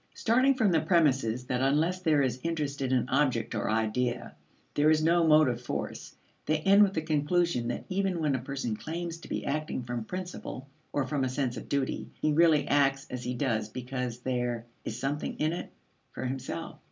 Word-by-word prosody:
Starting 255 +4 +3
from 220 -6 +3
the 160 -2 +3
premises 135 -8 +2
that 125 0 -1
unless 155 +7 +2
there 155 -5 +3
is 130 -1 -1
interest 150 -4 -2
in 130 -1 -1
an 125 -2 +2
object 130 -4 +1
or 110 - -1
idea, 110 +3 -1 0.4
there 150 +1 +4
is 155 0 +3
no 170 +1 +4
motive 150 -6 +4
force, 120 - -5 0.3
they 155 - +3
end 195 +4 +6
with 195 -2 +4
the 160 - 0
conclusion 155 -3 +1
that 120 - -3
even 190 -2 0
when 150 -3 +1
a 130 - 0
person 130 -3 -3
claims 165 +6 -5
to - - -12
be - - -3
acting 150 -2 -2
from 120 -1 -4
principle 180 -3 -6 0.2
or 145 - 0
from 135 +1 -1
a 130 - 0
sense 130 -1 -1
of - - -8
duty, 140 -2 -1
he 155 - +1
really 155 -2 +4
acts 135 -1 +2
as 125 -1 -4
he 125 0 -2
does 115 -5 -1
because 125 0 -4
there 120 -2 -2 0.2
"is 110 - -4
something 140 +3 -2
in 155 +2 +1
it" 175 - -6 0.4
for - - -5
himself. 130 -9 -5
140 Hz, 195 wpm, -29 LUFS, 125-160 Hz, 0.4 s, end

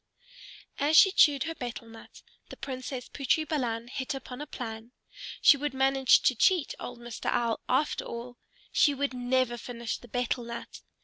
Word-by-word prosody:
As 300 +3 +4
she 385 - +8
chewed 290 -7 +5
her 330 - -4
betel 240 -5 -7
nut 225 0 -14 0.3
the - - -10
Princess 255 -1 -6
Putri 295 +3 0
Balan 240 -6 -2
hit 260 +2 -4
upon 260 0 -8
a 300 - -6
plan. 225 -2 -7 0.5
She 285 - +8
would 290 -1 -3
manage 265 -1 +4
to - - +4
cheat 330 - +2
old 245 - -7
Mr. 240 -1 -5
Owl 235 -2 0
after 265 +4 +1
all. 240 +1 -8 0.3
She 290 -2 +3
would 280 -1 -1
never 250 -1 0
finish 235 -1 -5
the 245 - -14
betel 245 +1 -2
nut! 235 0 -8
255 Hz, 170 wpm, -28 LUFS, 240-280 Hz, 0.5 s, she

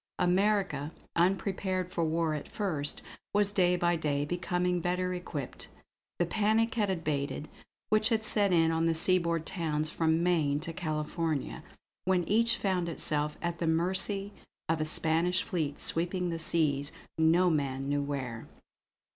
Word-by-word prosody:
America, 185 -5 +1 0.2
unprepared 185 +1 0
for 170 - -1
war 160 0 0
at 150 - -5
first, 160 -9 -2 0.3
was 205 0 +2
day 180 -2 +3
by 175 0 +2
day 145 -3 -1
becoming 180 +2 -1
better 180 +1 -1
equipped. 160 -7 -6 0.5
The 175 - +2
panic 220 +5 +1
had 215 -5 0
abated 155 -4 -2 0.4
which 215 +1 +3
had 220 -2 0
set 205 -3 +2
in 165 -2 +4
on 165 0 +1
the 165 - +2
seaboard 170 -1 +2
towns 155 -4 -2
from 160 0 +1
Maine 155 -5 +2
to 165 0 -5
California, 155 -2 -3 0.4
when 185 -1 +2
each 230 +5 +2
found 185 -3 0
itself 150 -2 -1
at 170 -1 -2
the 170 - -1
mercy 190 +5 +1 0.3
of 160 -1 0
a - - +1
Spanish 165 +5 +3
fleet 155 -7 -3
sweeping 175 +1 0
the 165 - -3
seas, 150 -4 +1 0.3
no 170 +3 +4
man 135 -3 -1
knew 145 0 0
where. 130 -5 -4
170 Hz, 145 wpm, -30 LUFS, 155-185 Hz, 0.5 s, in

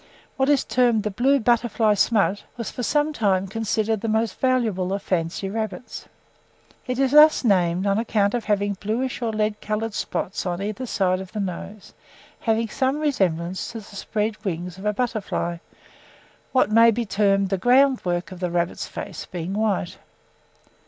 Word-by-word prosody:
What 265 +1 +1
is 285 -3 +3
termed 240 -4 +2
'the 210 - -2
blue 265 +7 +3
butterfly 235 -2 +2
smut' 205 -1 +2 0.2
was, 230 - -4
for - - -6
some 295 +4 +1
time, 195 -7 +1
considered 220 +1 -1
the 230 - -2
most 220 -2 0
valuable 220 -8 +1
of 200 - -3
fancy 175 +2 -2
rabbits. 220 +3 -5 0.8
It 250 -1 -2
is 270 -1 +2
thus 300 +1 +7
named 185 -4 +2
on 200 +1 +2
account 210 -3 +1
of 240 -2 -2
having 205 -1 +1
bluish 230 +7 -3
or 230 -2 0
lead 215 -1 -1
coloured 215 +1 -2
spots 190 - -3
on 175 -1 -3
either 215 +6 -4
side 185 -4 +1
of 190 - -10
the 215 - -3
nose, 195 +2 -6 0.5
having 225 0 0
some 265 +5 0
resemblance 190 - -1
to - - -5
the 205 -1 -11
spread 215 +2 -3
wings 180 -1 -4
of 195 - -9
a - - +3
butterfly, 215 -7 -2 0.9
what 255 -4 +2
may 230 +1 +7
be 230 +1 0
termed 195 -1 +2
the 195 -1 -1
groundwork 245 -8 +2
of 185 - -9
the 180 -1 -1
rabbit's 170 0 -2
face 190 -5 -7
being 175 +1 -5
white. 205 -4 -1
215 Hz, 170 wpm, -23 LUFS, 190-235 Hz, 0.9 s, thus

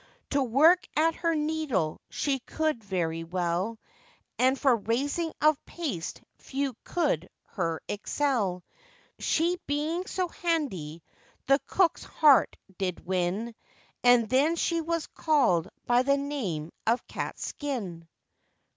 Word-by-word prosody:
To 280 - +2
work 295 +9 +5
at 325 +2 +4
her 335 0 0
needle 300 - -1
she 275 -2 -1
could 310 -2 -2
very 165 -4 -2
well, 180 +5 -1 0.6
And 260 +2 +4
for 265 -4 +4
raising 280 +10 -1
of 305 -1 +4
paste 265 - -5 0.2
few 270 -2 -3
could 285 - 0 0.2
her 165 -5 -2
excel; 205 -4 -1 0.6
She 345 +2 +1
being 310 +5 -1
so 370 -1 -1
handy, 195 - -2 0.4
the 275 +1 +4
cook's 370 -3 +2
heart 290 -7 +4 0.2
did 185 -3 -3
win, 185 +5 -1 0.5
And 245 -2 +6
then 280 +8 +3
she 335 0 0
was 335 0 -1
called 240 - +2 0.2
by 245 0 +4
the 280 +2 +3
name 210 - -3 0.2
of 235 +3 +2
Catskin. 200 - -5
265 Hz, 120 wpm, -28 LUFS, 185-310 Hz, 0.6 s, And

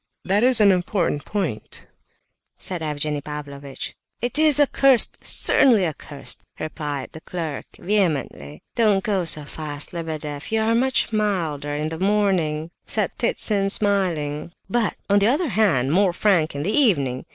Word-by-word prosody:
That 200 +4 +2
is 255 -2 +5
an 205 -2 +6
important 175 -5 -1
point," 175 - -4 0.7
said 180 -3 -1
Evgenie 150 -1 -2
Pavlovitch. 140 -2 -7 0.3
"It 245 +5 -2
is 305 -2 +5
accursed, 275 -3 +3
certainly 230 -9 +3
accursed!" 145 -3 -4 0.2
replied 150 -3 -5
the 160 - -11
clerk, 160 -6 -5
vehemently. 150 - -2
"Don't 210 -4 +2
go 195 -4 0
so 150 -2 +1
fast, 145 0 -4
Lebedeff; 155 -3 -5
you 220 - +2
are 220 +1 +1
much 245 -1 +1
milder 165 -9 -1
in 150 +1 -2
the 160 0 -6
morning," 185 -6 +1
said - - 0
Ptitsin, 200 -2 +2
smiling. 170 -7 -1
"But, 230 +2 0
on 200 0 +4
the 200 - +3
other 295 +6 +1
hand, 170 - +2
more 185 +1 +3
frank 175 -6 +1
in 140 - -3
the 200 - -1
evening! 140 - +2
175 Hz, 145 wpm, -22 LUFS, 150-210 Hz, 0.7 s, an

